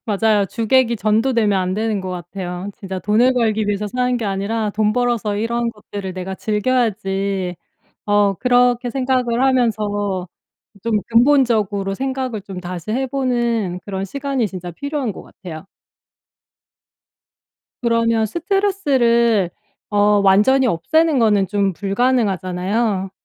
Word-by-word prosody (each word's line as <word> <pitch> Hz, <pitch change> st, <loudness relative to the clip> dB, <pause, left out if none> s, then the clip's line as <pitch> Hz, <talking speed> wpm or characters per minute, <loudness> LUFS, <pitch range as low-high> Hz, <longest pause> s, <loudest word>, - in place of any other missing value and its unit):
맞아요. 210 Hz, -1 st, +2 dB
주객이 235 Hz, +3 st, +2 dB
전도되면 215 Hz, -1 st, +2 dB
안 185 Hz, 0 st, -1 dB
되는 215 Hz, -1 st, -1 dB
것 190 Hz, -, -6 dB
같아요. 180 Hz, +1 st, -6 dB
'진짜 190 Hz, -1 st, -6 dB
돈을 220 Hz, +7 st, +3 dB
벌기 220 Hz, -3 st, +1 dB
위해서 205 Hz, 0 st, -1 dB
사는 250 Hz, +3 st, 0 dB
게 235 Hz, -, -3 dB
아니라 205 Hz, +2 st, -1 dB
돈 210 Hz, +1 st, +1 dB
벌어서 235 Hz, -3 st, 0 dB
이런 235 Hz, +2 st, -1 dB
것들을 205 Hz, -3 st, -7 dB
내가 185 Hz, +1 st, -5 dB
즐겨야지.' 200 Hz, -5 st, -1 dB, 0.5 s
어 205 Hz, -1 st, +3 dB
그렇게 245 Hz, +2 st, +2 dB
생각을 255 Hz, -1 st, 0 dB
하면서 210 Hz, -7 st, 0 dB, 0.6 s
좀 225 Hz, -2 st, +1 dB
근본적으로 230 Hz, -6 st, +2 dB
생각을 260 Hz, -3 st, -3 dB
좀 190 Hz, -2 st, -8 dB
다시 180 Hz, +2 st, -6 dB
해 265 Hz, +4 st, -1 dB
보는 235 Hz, -8 st, -1 dB
그런 195 Hz, -1 st, -3 dB
시간이 275 Hz, 0 st, -2 dB
진짜 180 Hz, -2 st, -7 dB
필요한 280 Hz, -, -3 dB
것 -, -, -10 dB
같아요. 175 Hz, -1 st, -10 dB, 2.2 s
그러면 230 Hz, -1 st, +2 dB
스트레스를 265 Hz, -, +1 dB, 0.4 s
어 205 Hz, 0 st, +3 dB
완전히 210 Hz, +8 st, +4 dB
없애는 300 Hz, -, +2 dB
거는 210 Hz, -4 st, +3 dB
좀 200 Hz, 0 st, 0 dB
불가능하잖아요. 195 Hz, -1 st, 0 dB
215 Hz, 285 characters per minute, -19 LUFS, 195-245 Hz, 2.2 s, 완전히